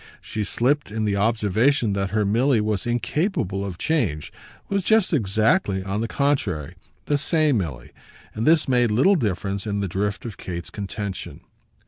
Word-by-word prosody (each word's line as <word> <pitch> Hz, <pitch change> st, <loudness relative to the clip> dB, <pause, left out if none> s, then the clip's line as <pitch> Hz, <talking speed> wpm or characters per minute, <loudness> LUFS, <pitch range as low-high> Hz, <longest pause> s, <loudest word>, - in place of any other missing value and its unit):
She 110 Hz, -, -4 dB
slipped 135 Hz, +8 st, 0 dB
in 110 Hz, +1 st, -2 dB
the 100 Hz, -1 st, +1 dB
observation 110 Hz, +3 st, +2 dB
that 100 Hz, 0 st, -1 dB
her 105 Hz, 0 st, +1 dB
Milly 120 Hz, +5 st, +3 dB
was 105 Hz, 0 st, -1 dB
incapable 120 Hz, -, -1 dB
of 95 Hz, -3 st, -5 dB
change, 105 Hz, -, -1 dB, 0.3 s
was 200 Hz, -1 st, 0 dB
just 220 Hz, -2 st, +3 dB
exactly, 110 Hz, -, +2 dB
on 100 Hz, +3 st, -2 dB
the 115 Hz, -, -1 dB
contrary, 115 Hz, -, -1 dB, 0.3 s
the 145 Hz, -1 st, +1 dB
same 155 Hz, -5 st, +2 dB
Milly; 70 Hz, -10 st, -5 dB, 0.4 s
but 110 Hz, +2 st, -2 dB
this 160 Hz, -1 st, +4 dB
made 125 Hz, -2 st, +3 dB
little 130 Hz, -, +4 dB
difference 100 Hz, -, -2 dB
in 100 Hz, -1 st, -1 dB
the 100 Hz, -, -1 dB
drift 100 Hz, +5 st, -2 dB
of 110 Hz, -4 st, -6 dB
Kate's 85 Hz, -1 st, -6 dB
contention. 100 Hz, -1 st, -6 dB
110 Hz, 160 wpm, -23 LUFS, 100-140 Hz, 0.4 s, this